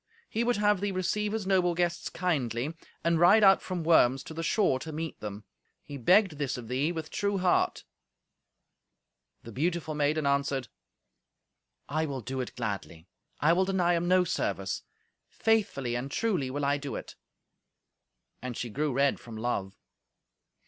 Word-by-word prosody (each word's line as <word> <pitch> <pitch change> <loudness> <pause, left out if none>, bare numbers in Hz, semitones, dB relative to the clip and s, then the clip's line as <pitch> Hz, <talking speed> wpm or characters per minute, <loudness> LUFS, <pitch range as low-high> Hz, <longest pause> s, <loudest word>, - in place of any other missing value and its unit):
He 230 - -1
would 240 -1 +1
have 205 -1 +3
thee 205 0 0
receive 200 +3 -1
his 220 -2 -2
noble 185 -3 +2
guests 175 0 -1
kindly, 140 -5 -1 0.3
and 170 -1 +2
ride 195 +6 +6
out 195 -1 +7
from 180 -3 -4
Worms 135 -5 +4
to - - -9
the 165 - -4
shore 165 -5 +2
to 160 - -7
meet 160 +1 -5
them. 105 0 -7 0.4
He 145 - -9
begged 180 - +3
this 140 -3 -1
of 115 -2 -8
thee 135 +6 0
with 160 -2 -6
true 200 -1 0
heart." 180 -1 +1 1.6
The 115 - -9
beautiful 160 +4 -1
maiden 150 +1 +1
answered, 140 -3 0 1.2
"I 155 +2 -1
will 135 -3 -4
do 130 +3 -3
it 125 - -7
gladly. 100 -7 -5 0.4
I 160 +3 +5
will 185 +2 +3
deny 185 -2 +2
him 170 0 0
no 185 0 +5
service. 180 +1 -2 0.5
Faithfully 200 - 0
and 120 +3 -3
truly 180 -6 0
will 145 +2 -2
I 145 +1 +1
do 140 -1 -5
it." - - -7 1.3
And 125 -1 -5
she 120 - -4
grew 150 +5 -1
red 140 +2 +2
from 115 -2 -10
love. 100 -4 -3
155 Hz, 165 wpm, -29 LUFS, 130-185 Hz, 1.6 s, out